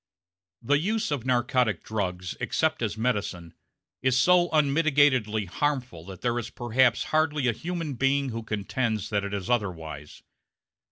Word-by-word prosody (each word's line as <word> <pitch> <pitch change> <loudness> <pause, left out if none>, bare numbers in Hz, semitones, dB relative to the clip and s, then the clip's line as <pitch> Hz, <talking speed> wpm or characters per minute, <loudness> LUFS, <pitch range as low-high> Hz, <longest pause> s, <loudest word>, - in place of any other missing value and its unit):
The 145 +5 +3
use 215 +3 -1
of 130 -4 -2
narcotic 125 -2 +1
drugs 90 -4 -3
(except 155 -3 0
as 110 -2 -2
medicine) 100 -8 -2 0.5
is 130 -1 +2
so 175 +5 +4
unmitigatedly 140 -8 +3
harmful 125 - -2
that 95 -2 -9
there 120 -1 0
is 120 0 -6
perhaps 120 +1 +2
hardly 155 -3 +2
a - - +4
human 165 +3 -4
being 135 +2 +1
who 115 -1 -4
contends 110 0 -2
that 100 -1 0
it 100 - -4
is 100 -3 -4
otherwise. 80 -10 -3
120 Hz, 145 wpm, -26 LUFS, 105-145 Hz, 0.5 s, so